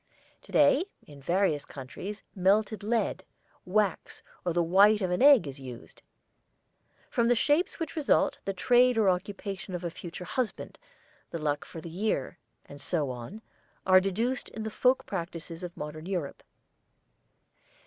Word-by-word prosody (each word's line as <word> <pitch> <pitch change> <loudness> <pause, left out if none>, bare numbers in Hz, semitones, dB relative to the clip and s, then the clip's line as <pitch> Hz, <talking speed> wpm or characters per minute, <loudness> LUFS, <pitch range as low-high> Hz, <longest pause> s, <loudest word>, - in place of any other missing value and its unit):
To - - -17
day 290 +3 +5 0.2
in 145 -2 -14
various 170 -2 +1
countries 165 +12 -8
melted 205 +3 +2
lead, 210 -3 -1 0.4
wax, 200 -1 -1 0.2
or 175 - 0
the 170 +1 +2
white 200 +5 +5
of 185 -3 -1
an 180 - 0
egg, 275 - +7
is 140 0 -7
used. 125 -3 -10 1.1
From 235 -3 +2
the 245 - +4
shapes 295 +9 +1
which 325 - -4
result, 305 -3 +2
the 195 - -1
trade 245 +5 +4
or 210 -3 +4
occupation 195 +1 -4
of 175 - -5
a 170 - -3
future 180 +1 -8
husband, 250 +4 -3 0.5
the - - -4
luck 150 -2 -2
for 165 - -9
the 170 - -8
year, 185 -6 -2 0.3
and 145 0 -12
so 150 -7 -1
on, 125 - -8 0.4
are 185 0 +7
deduced 225 +7 -1
in 220 - -6
the 220 - -4
folk 255 +4 +2
practices 170 -2 -6
of 175 -1 -7
modern 155 +2 -6
Europe. 175 -7 -3
190 Hz, 155 wpm, -29 LUFS, 165-220 Hz, 1.1 s, egg